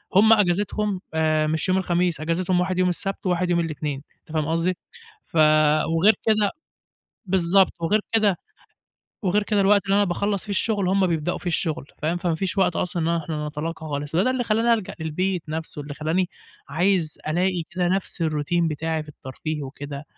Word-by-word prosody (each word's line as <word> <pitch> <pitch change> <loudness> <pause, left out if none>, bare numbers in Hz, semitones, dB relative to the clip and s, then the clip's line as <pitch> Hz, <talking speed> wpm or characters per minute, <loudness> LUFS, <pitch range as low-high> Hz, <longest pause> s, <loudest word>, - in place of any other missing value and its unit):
هُم 220 +3 +7
أجازتهم 205 0 +1
آآ، 155 -1 +2
مش 160 +4 0
يوم 185 - +3
الخميس، 175 -3 0
أجازتهم 175 +3 0
واحد 185 0 0
يوم 185 0 +3
السبت 195 +3 -3
واحد 180 0 +1
يوم 170 -1 +2
الإتنين 150 -4 -3 0.2
أنت - - -18
فاهم 155 -2 0
قصدي؟ 165 +2 0 0.5
ف 165 - -5 0.6
وغير 205 +7 +5
كده 210 -2 +3 0.7
بالضبط، 190 0 +3
وغير 210 +6 +2
كده 210 -5 +3 0.9
وغير 200 +3 +2
كده 205 -1 +1
الوقت 200 0 +4
اللي 195 0 +2
أنا 205 - +4
باخلّص 200 +2 -1
في 210 - -8
الشغل 200 -1 0
هُم 190 0 +3
بيبدأوا 165 0 -1
فيه - - -13
الشغل 165 -3 -1 0.2
فاهم؟ 165 +3 0
فما 175 -2 0
فيش 190 +4 -2
وقت 185 -3 +2
أصلًا 175 -2 -1
إن - - -1
احنا 150 -1 -4
نتلاقى 155 +3 -4
خالص، 145 +2 -3
هو 180 - +4
ده 255 - +2
اللي 255 -2 -1
خلّاني 230 +2 +3
الجأ 215 -5 -5
للبيت 175 +3 -1
نفسه، 160 -1 -5
اللي 145 0 -7
خلّاني 170 +5 -1 0.4
عايز 170 +1 +1
ألاقي 175 +2 +1
كده 180 -1 -1
نفس 190 -1 -1
الروتين 160 +2 0
بتاعي 160 +1 -2
في 155 - -16
الترفيه 150 +2 -6
وكده 140 +1 -7
175 Hz, 180 wpm, -23 LUFS, 160-195 Hz, 0.9 s, هُم